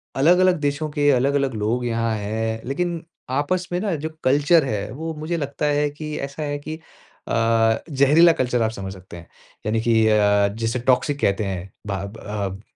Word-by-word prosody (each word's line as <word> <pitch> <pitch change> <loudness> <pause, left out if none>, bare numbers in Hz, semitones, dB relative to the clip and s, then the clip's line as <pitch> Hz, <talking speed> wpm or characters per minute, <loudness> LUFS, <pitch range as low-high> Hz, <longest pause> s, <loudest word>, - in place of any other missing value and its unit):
अलग-अलग 180 +5 +4
देशों 145 +1 -1
के 145 0 +1
अलग-अलग 135 0 +1
लोग 115 +4 -1
यहाँ 115 -1 0
हैं, 110 +2 -3
लेकिन 170 +5 -2 0.3
आपस 150 +7 -1
में 175 - 0
न 195 -6 0
जो 160 +2 -3
कल्चर 145 +4 +4
है, 105 -5 -3
वो 160 +4 -5
मुझे 160 +3 -3
लगता 145 0 -3
है 145 0 +2
कि 150 +1 -6
ऐसा 140 +2 -5
है 145 0 -3
कि 155 +2 -7 0.5
अ, - - -3 0.6
ज़हरीला 150 +5 +5
कल्चर 125 -2 0
आप 110 0 +1
समझ 95 -3 -6
सकते 90 -2 -12
हैं। 85 - -12 0.4
यानी 110 +1 +1
कि 115 0 +2
अ, 105 -1 +4
जिसे 115 +2 -1
टॉक्सिक 135 +3 +1
कहते 100 +2 +1
हैं, 95 -1 -5 0.2
भाब 100 +2 -4
अब 100 -2 -5
135 Hz, 180 wpm, -22 LUFS, 110-150 Hz, 0.6 s, ज़हरीला